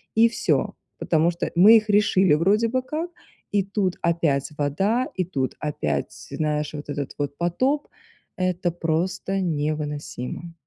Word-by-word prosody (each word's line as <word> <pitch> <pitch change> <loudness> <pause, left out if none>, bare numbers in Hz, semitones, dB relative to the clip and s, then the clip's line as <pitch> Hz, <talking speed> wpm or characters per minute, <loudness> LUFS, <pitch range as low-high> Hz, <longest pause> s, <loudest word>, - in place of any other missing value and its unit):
и 225 +1 +6
всё. 235 - 0 0.3
Потому 165 +1 +2
что 170 - -4
мы 205 +6 +8
их 215 0 -2
решили, 200 -4 +4
вроде 200 +8 +3
бы, 255 +2 0
как, 315 +6 -4 0.4
и 200 -1 +2
тут 195 -2 -1
опять 165 -5 +1
вода, 195 - +1
и 185 - 0
тут 135 -7 -2
опять, 150 -1 -2 0.2
знаешь, 150 -1 -1
вот 150 0 -8
этот 145 -1 -4
вот 145 0 -3
потоп. 255 - 0 0.5
Это 185 -1 0
просто 180 +4 -1
невыносимо. 150 -1 -3
175 Hz, 140 wpm, -24 LUFS, 150-205 Hz, 0.5 s, мы